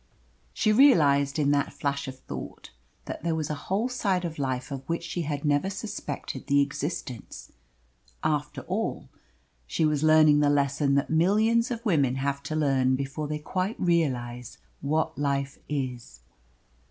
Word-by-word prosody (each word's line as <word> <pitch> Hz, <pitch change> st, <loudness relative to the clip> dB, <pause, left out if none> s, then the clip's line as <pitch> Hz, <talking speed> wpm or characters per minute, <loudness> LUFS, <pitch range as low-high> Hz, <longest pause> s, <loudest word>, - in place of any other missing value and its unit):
She 215 Hz, -2 st, +2 dB
realised 145 Hz, -, +5 dB
in 145 Hz, -2 st, +2 dB
that 145 Hz, 0 st, +1 dB
flash 140 Hz, -1 st, -2 dB
of 130 Hz, 0 st, -7 dB
thought -, -, -8 dB, 0.3 s
that -, -, -6 dB
there 165 Hz, 0 st, 0 dB
was 155 Hz, -2 st, -2 dB
a 150 Hz, -, -7 dB
whole 205 Hz, +6 st, +1 dB
side 195 Hz, -8 st, 0 dB
of 160 Hz, -3 st, -5 dB
life 130 Hz, 0 st, -2 dB
of 135 Hz, -2 st, -4 dB
which 170 Hz, 0 st, -1 dB
she 170 Hz, +1 st, -3 dB
had 145 Hz, -2 st, -3 dB
never 145 Hz, +5 st, +2 dB
suspected 195 Hz, -7 st, -6 dB
the 140 Hz, 0 st, +4 dB
existence. 140 Hz, -, -4 dB, 0.7 s
After 150 Hz, -1 st, -1 dB
all, -, -, -3 dB, 0.6 s
she 155 Hz, -, +1 dB
was 150 Hz, -2 st, +1 dB
learning 155 Hz, -1 st, +6 dB
the 145 Hz, -1 st, +3 dB
lesson 140 Hz, 0 st, +2 dB
that 140 Hz, -, 0 dB
millions 215 Hz, +8 st, +3 dB
of 235 Hz, -1 st, -5 dB
women 140 Hz, -, +2 dB
have 140 Hz, +1 st, -2 dB
to 155 Hz, -, -2 dB
learn 135 Hz, -4 st, +2 dB
before 140 Hz, +3 st, -3 dB
they 150 Hz, +1 st, -2 dB
quite 185 Hz, +7 st, -3 dB
realise 125 Hz, -9 st, -1 dB, 0.2 s
what 150 Hz, -1 st, -1 dB
life 140 Hz, -1 st, -1 dB
is. 125 Hz, -, -4 dB
145 Hz, 155 wpm, -27 LUFS, 140-170 Hz, 0.7 s, learning